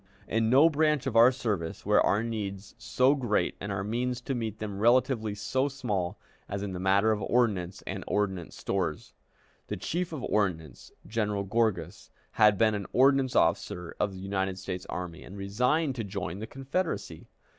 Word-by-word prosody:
In 110 0 +1
no 135 +6 +7
branch 150 -3 +2
of 130 -4 -2
our 115 +3 +8
service 105 -10 -3
were - - +4
our 105 +3 +2
needs 100 -4 -5
so 125 +4 +3
great 120 -7 0
and 100 - -4
our 95 -1 -2
means 120 +4 -1
to 135 - -3
meet 110 -4 -3
them 105 -2 -5
relatively 115 -2 +2
so 130 +6 0
small 105 -9 -2 0.3
as 100 0 -3
in 100 -2 -4
the 90 - -4
matter 100 +4 +3
of 105 -1 -1
ordnance 100 -6 0
and 95 +1 -4
ordnance 95 -5 -1
stores. - - -3 0.5
The - - -4
Chief 175 +1 -2
of 150 -6 -5
Ordnance, 80 - -2
General 105 -2 -1
Gorgas, 110 +1 -1 0.2
had 105 -2 +5
been 110 0 +3
an 100 -2 -3
ordnance 135 0 +3
officer 85 +1 +1
of 105 - +1
the 95 - -9
United 95 -1 -2
States 90 -1 -5
Army, 90 -1 -5
and 100 - -10
resigned 125 +10 +1
to 115 - -2
join 95 -2 -4
the 110 - -5
Confederacy. 140 +8 -3
105 Hz, 175 wpm, -29 LUFS, 95-125 Hz, 0.5 s, our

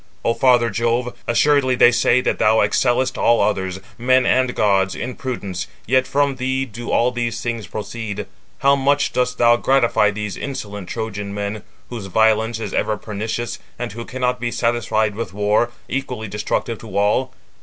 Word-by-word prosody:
O 115 - +3
father 120 -2 +3
Jove, 120 +3 0
assuredly 130 +1 +3
they 120 - +6
say 125 +1 +3
that - - -1
thou 110 +1 +4
excellest 120 +5 +1
all 120 - +4
others, 95 -2 0 0.2
men 130 +1 +3
and 130 -1 +2
gods, 95 -2 +2
in 125 +1 -4
prudence, 105 -9 -5 0.2
yet 130 +2 +2
from 140 -1 +1
thee 130 +1 -1
do 120 0 -8
all 125 +1 +2
these 120 -2 -2
things 115 -5 -4
proceed. 110 0 -5 0.4
How 140 0 +5
much 140 +1 +1
dost 125 0 0
thou 120 0 +5
gratify 120 -5 +3
these 105 -2 -4
insolent 105 -8 -6
Trojan 105 -3 -4
men, 100 +1 -3 0.3
whose 115 -5 -5
violence 110 +3 +2
is 115 - -5
ever 110 0 0
pernicious, 110 +3 -4 0.2
and 120 -1 -4
who 115 +3 -6
cannot 125 0 -2
be 120 - -1
satisfied 115 -3 0
with 105 -3 -5
war, 105 +3 +2 0.2
equally 125 -4 -4
destructive 105 +2 -2
to 110 -2 -6
all! 105 +6 +2
115 Hz, 165 wpm, -20 LUFS, 105-125 Hz, 0.4 s, they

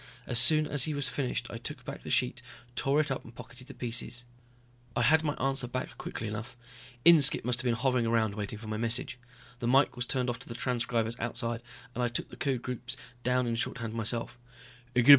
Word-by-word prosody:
As 120 -2 +4
soon 155 -1 +8
as 145 -3 +1
he 155 - -2
was 145 -1 -1
finished 135 -3 -2
I - - -6
took - - -6
back - - -6
the - - -8
sheet, - - +1 0.3
tore 140 +2 +2
it 150 -2 +1
up 135 - -2
and 115 +1 -14
pocketed 125 +2 -11
the - - -10
pieces. 120 0 -3 0.7
I 120 - +2
had 160 +6 +5
my 150 -2 -1
answer 135 -1 0
back 130 +1 -4
quickly 115 - -5
enough, 110 +4 -6 0.5
Inskipp 160 -9 +7
must 120 -1 +2
have - - -9
been 120 -2 +2
hovering 125 -1 +1
around 115 -2 +2
waiting 105 0 -4
for 110 +1 -10
my 110 0 -3
message. 120 +3 0 0.4
The 120 - -2
mike 135 +3 +4
was 125 -1 -2
turned 130 -1 0
off 115 - -7
to 135 - -11
the 115 - -6
transcribers 120 -2 -1
outside, 115 0 -2 0.3
and 125 - -3
I - - +3
took 115 - -3
the - - -9
code 130 -4 -1
groups 125 -1 -5 0.2
down 125 +1 +1
in 120 - -1
shorthand 115 -1 -3
myself. 115 +2 -3
120 Hz, 215 wpm, -30 LUFS, 115-130 Hz, 0.7 s, soon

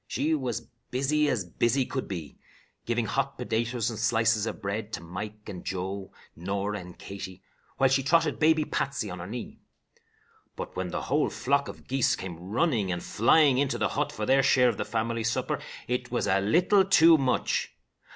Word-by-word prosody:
She 155 +2 0
was 120 -6 -2 0.2
busy 145 +4 +1
as 115 -9 0
busy 120 +9 +1
could 130 0 -4
be, 85 -7 -7 0.5
giving 120 0 0
hot 135 +6 -1
potatoes 115 0 -1
and 110 - -6
slices 115 -1 +2
of - - -5
bread 105 +1 -4
to 85 - -4
Mike 105 +5 -7
and 95 -4 -7
Joe, 95 +1 -4 0.2
Norah 100 +4 -2
and 90 -1 -11
Katie, 95 -1 -8 0.3
while 135 - +5
she 135 +1 +2
trotted 155 +2 +2
baby 155 0 +4
Patsy 130 -9 -2
on 90 - -6
her 85 - -6
knee. 120 +3 -7 1.0
But - - -7
when 95 0 -2
the - - -3
whole - - +1
flock 140 +2 0
of - - -10
geese 130 -1 +2
came 90 -7 -7
running 105 - 0
and 90 0 -3
flying 135 +4 +4
into 140 -1 +1
the - - +1
hut - - -1
for 105 - -4
their 135 +4 +4
share 125 -1 +4
of 110 - -3
the - - -2
family 115 0 -1
supper, 115 +1 -1 0.3
it 125 0 -2
was 120 - -1
a 95 -1 +3
little 180 - +4
too 170 -4 +7
much. 130 -2 0
115 Hz, 185 wpm, -28 LUFS, 100-135 Hz, 1.0 s, too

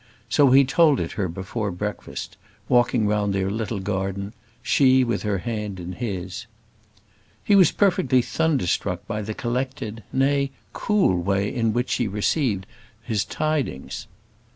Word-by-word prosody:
So 140 +4 +5
he 135 +2 +6
told 145 +1 +4
it 85 - -3
her 95 - -2
before 95 +5 -4
breakfast, 105 +3 -5 0.3
walking 120 -3 +3
round 105 -1 +1
their 95 0 0
little 110 0 -3
garden, 95 +1 -3 0.3
she 130 0 +4
with 120 -4 -1
her 105 -2 0
hand 105 -1 -4
in 90 +1 -6
his. 95 0 -5 1.0
He 205 - +4
was 185 -5 +7
perfectly 180 - +2
thunderstruck 105 - 0
by 110 0 -3
the 110 +1 -5
collected 120 -2 -3
nay, 140 +1 +2 0.2
cool 195 - +2
way 100 +2 0
in 115 -3 +1
which 120 +3 -1
she 120 - +1
received 105 0 0 0.4
his 105 -3 0
tidings. 155 - -3
110 Hz, 140 wpm, -24 LUFS, 100-130 Hz, 1.0 s, was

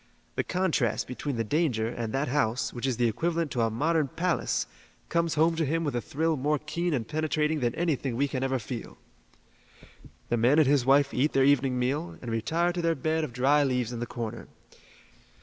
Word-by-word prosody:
The - - 0
contrast 160 - 0
between 130 +2 -4
the 115 - 0
danger 120 -3 0
and 115 -1 -4
that 135 +4 -1
house, 125 -2 0
which 120 +2 -3
is 125 -4 -1
the 120 - +3
equivalent 165 +6 -1
to 120 - 0
a 115 - +2
modern 150 +6 +1
palace, 165 +3 -1 0.4
comes 170 -1 +1
home 165 +2 +3
to 165 - +1
him 165 +3 0
with 145 -5 -2
a 120 - 0
thrill 160 +5 0
more 150 +3 +1
keen 160 +4 -2
and 115 -4 -3
penetrating 155 +1 0
than 120 -2 0
anything 145 -7 -1
we 140 +4 +1
can 130 -2 -3
ever 135 0 0
feel. 115 0 -7 1.3
"The 120 - +1
man 120 +6 +4
and 155 -4 +5
his 135 -3 +3
wife 140 +1 +4
eat 140 +5 +1
their 135 -1 +4
evening 135 -2 +3
meal, 140 +7 -2
and 120 - -6
retire 165 +11 0
to 175 - -2
their 165 -1 +1
bed 160 +3 0
of 155 - -4
dry 135 +4 +3
leaves 125 -3 0
in 120 - -4
the 120 - -3
corner. 115 -1 -6
140 Hz, 205 wpm, -28 LUFS, 120-160 Hz, 1.3 s, and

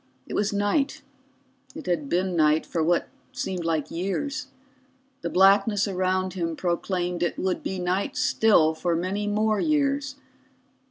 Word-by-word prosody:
It - - -8
was 205 0 +1
night, 205 +8 0 0.7
it 315 - -8
had 160 -6 -1
been 180 +1 0
night 155 -1 +3
for 165 - -2
what 170 +2 +1 0.3
seemed 190 -8 -3
like 160 -3 -1
years, 265 - -3 0.7
the - - -3
blackness 200 +2 +4
around 185 -1 0
him 165 -3 -2
proclaimed 175 +1 -2
it 175 - 0
would 185 -1 -1
be 190 - -4
night 185 +2 -1
still 170 -8 +4
for 170 +2 -1
many 190 +5 -2
more 215 0 +1
years. 285 -2 0
185 Hz, 145 wpm, -25 LUFS, 175-210 Hz, 0.7 s, blackness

